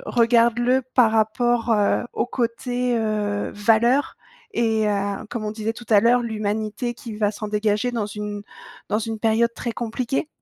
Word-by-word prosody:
«Regarde-le 240 +2 +3
par 235 -4 +5
rapport, 230 +2 +1
heu, 210 +1 +2
au - - -1
côté, 245 0 -1
heu, 210 -2 -1
valeur» 230 +6 +2 0.4
et 220 - +1
à 200 0 -2
comme 230 -3 -4
on 210 - -2
disait 220 +1 -3
tout 235 -1 -12
à 205 - +6
l'heure, 240 +3 +4
l'humanité 215 +2 -3
qui 225 -2 -8
va 210 -1 +1
s'en 215 0 -6
dégager 210 +3 0
dans 220 -3 -1
une 210 0 -5 0.5
dans 210 - +1
une 225 0 -4
période 230 +1 +2
très 235 - -4
compliquée? 245 +6 -2
225 Hz, 160 wpm, -23 LUFS, 210-240 Hz, 0.5 s, à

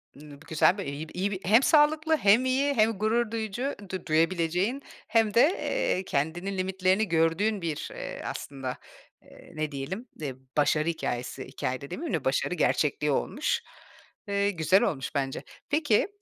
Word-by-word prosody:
Imm, 150 +1 -13
bu - - -16
güzel 165 +5 +3
bir, 200 - -4
iyi 145 +3 -5
bir, - - -14
iyi 195 +3 0
bir 190 - -3
Hem 225 +7 +5
sağlıklı, 310 +1 +4
hem 220 +4 +4
iyi, 275 +2 +2
hem 225 -3 +3
gurur 220 +2 0
duyucu 230 +5 -3 0.2
du 185 -1 -5
duyabileceğin, 175 - +1 0.3
hem 225 -2 +2
de, 235 - +6
eee, 320 - +1
kendinin 175 +7 -2
limitlerini 190 +2 +1
gördüğün 170 +5 +1
bir, 160 -3 -3
eee, - - -6
aslında, 135 -2 -5 0.4
eee, - - -16
ne 155 -1 -2
diyelim, 175 - -5
e, 140 -3 -3 0.2
başarı 150 +2 +2
hikâyesi. 130 -5 -3
Hikâye 130 +1 -3
de 140 - -9
demeyeyim 315 - -4
de, - - -1
başarı - - +1
gerçekliği - - +1
olmuş. 475 -1 0 0.7
Eee, 200 0 +1
güzel 170 +2 +3
olmuş 135 0 -2
bence. 135 -1 -2 0.3
Peki, 290 - +2
190 Hz, 165 wpm, -27 LUFS, 155-225 Hz, 0.7 s, de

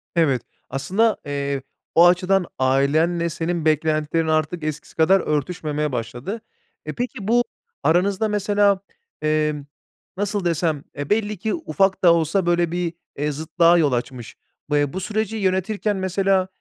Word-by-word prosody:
Evet, 145 -7 +2 0.3
aslında, 190 - +1
eee, 140 -1 -2 0.3
o 170 - +8
açıdan 180 +1 +3
ailenle 155 +6 +2
senin 165 0 -2
beklentilerin 155 +1 +1
artık 155 +1 0
eskisi 155 -1 -5
kadar 185 +4 +4
örtüşmemeye 150 -1 -2
başladı. 125 - -4 0.4
E, - - -4
peki 240 -5 -4
bu 240 +2 +4 0.4
aranızda 195 +5 +2
mesela, 205 -1 +2 0.4
emm, 150 -1 0 0.5
nasıl 205 -1 -1
desem? 160 -3 0
Eee, 145 0 -4
belli 210 -1 0
ki 220 +4 -2
ufak 195 - 0
da 170 -2 +7
olsa, 170 +3 +1
böyle, 175 -1 +2
bir, 175 -1 -2 0.2
eee, 150 +1 -1
zıtlığa 165 +3 +3
yol 150 -4 +3
açmış. 120 -1 -4 0.4
B 150 - +3
eee, 145 -1 0
bu 190 - -3
süreci 215 +2 -2
yönetirken 195 +1 0
mesela, 190 0 +1
170 Hz, 140 wpm, -22 LUFS, 150-195 Hz, 0.5 s, o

